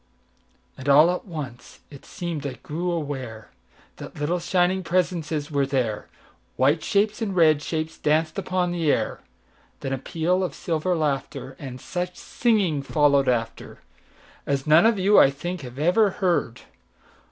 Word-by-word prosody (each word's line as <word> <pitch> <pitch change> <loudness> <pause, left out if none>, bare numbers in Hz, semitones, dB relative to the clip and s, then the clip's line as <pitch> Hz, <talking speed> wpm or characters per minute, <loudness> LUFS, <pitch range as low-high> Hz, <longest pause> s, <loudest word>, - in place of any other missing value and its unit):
And 135 +2 -3
all 150 +5 +7
at 180 - -4
once 145 - -8
it 140 - -13
seem'd 165 -5 -4
I 135 - -5
grew 155 +9 -5
awareThat 125 - -7
little, 165 +5 0
shining 180 +2 +1
presences 165 -4 -1
were 140 -2 +1
there,—White 130 +3 -2
shapes 205 +4 +1
and 200 -4 -2
red 155 -4 +4
shapes 160 +1 -4
danced 155 +1 +1
upon 180 -1 -1
the 165 -4 +1
air; - - -1 0.6
Then 135 - -3
a 135 - -2
peal 170 +7 0
of 180 - -3
silver 170 +2 -1
laughter, 140 -3 -3
And 130 -3 -7
such 180 +3 -4
singing 200 - 0
followed 140 -1 +2
afterAs 125 +3 -5
none 155 +6 +6
of 225 -2 +2
you, 195 +2 +5
I - - +7
think, 175 +6 -5
have 125 -1 -10
ever 180 +8 +3
heard. 175 - -1
155 Hz, 140 wpm, -24 LUFS, 140-180 Hz, 0.6 s, all